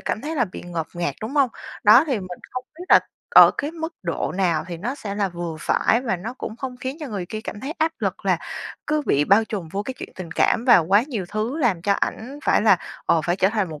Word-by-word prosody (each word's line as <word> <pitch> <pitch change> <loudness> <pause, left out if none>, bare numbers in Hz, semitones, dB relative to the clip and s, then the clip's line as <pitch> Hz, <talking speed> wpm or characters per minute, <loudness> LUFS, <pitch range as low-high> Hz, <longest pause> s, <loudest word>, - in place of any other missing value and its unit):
cảm - - -2
thấy 305 +5 -4
là 245 - +3
bị 185 - -9
ngột 170 -3 -4
ngạt, 175 0 -2
đúng 220 +6 -5
hông? 275 -4 +3 0.3
Đó, 225 +7 +8
thì 265 -7 0
mình 185 -2 -7
không 255 0 -5
biết 355 - -7
là - - +8 0.3
ở - - +9
cái 290 - -1
mức 325 0 -5
độ 170 -2 -2
nào 180 -4 +1
thì 175 - -5
nó 225 +10 -3
sẽ 210 -8 -6
là 200 -1 0
vừa 170 -2 -5
phải 230 +8 +2
và 230 -7 -1
nó 220 +8 -6
cũng 220 - -6
không 255 0 -6
khiến 260 +2 -5
cho 300 - -5
người 200 -6 -4
kia 215 +4 -5
cảm 210 -1 -7
thấy 275 +6 -4
áp 320 +1 +1
lực - - -3
là - - +3 0.5
cứ 305 0 +1
bị 145 +1 +3
bao 200 +5 +5
trùm 200 -7 -5
vô 195 +5 -3
cái 260 +5 -5
chuyện - - -8
tình 180 -3 -8
cảm 225 +6 +2
vào 215 -10 +6
quá 200 +5 +5
nhiều 235 -9 -4
thứ 215 +8 -2
làm 215 - +1
cho 200 - +2
ảnh 245 +7 -3
phải - - +3
là, 205 -4 +6 0.3
ồ, 165 - +4
phải 175 +3 0
trở 190 - +3
thành 210 -3 -1
một 155 -2 -8
210 Hz, 265 wpm, -23 LUFS, 180-255 Hz, 0.5 s, ở